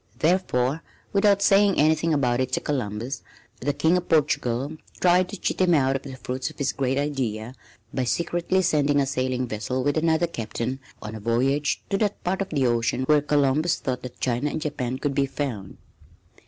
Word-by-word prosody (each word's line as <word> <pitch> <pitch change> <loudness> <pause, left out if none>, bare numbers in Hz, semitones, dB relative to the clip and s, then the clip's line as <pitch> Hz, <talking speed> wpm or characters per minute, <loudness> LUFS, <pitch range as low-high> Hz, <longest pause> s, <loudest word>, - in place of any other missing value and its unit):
Therefore, 155 -5 +1 0.3
without 200 0 +4
saying 200 0 +4
anything 155 +2 +3
about 125 -5 +2
it 130 -1 -1
to - - +2
Columbus, 125 -1 -3 0.4
the 145 - 0
King 160 +5 +2
of 180 - -5
Portugal 145 -2 +1 0.2
tried 180 0 +4
to 205 - -6
cheat - - -1
him 175 -2 +4
out 135 -2 +2
of 135 - -2
the 135 -2 -8
fruits 130 0 -4
of - - -15
his 140 - 0
great 135 0 0
idea 130 -6 -2 0.4
by 130 - 0
secretly 175 +6 0
sending 145 -3 +2
a 140 - +2
sailing 130 -1 -1
vessel 120 +3 -3
with 145 +2 +1
another 160 +1 +2
captain 125 -3 -4 0.2
on 105 0 -6
a 110 - -6
voyage 130 +7 0
to 195 - +1
that 205 -2 -1
part 190 +2 -1
of 195 - -3
the 140 -4 +1
ocean 120 +1 +1
where 150 +2 +4
Columbus 150 +3 +2
thought 125 -1 -3
that 125 -1 -9
China 125 +3 0
and 150 - -3
Japan 130 -5 -3
could 145 +1 -2
be 140 0 +1
found. 120 -9 -5
140 Hz, 190 wpm, -25 LUFS, 125-160 Hz, 0.4 s, without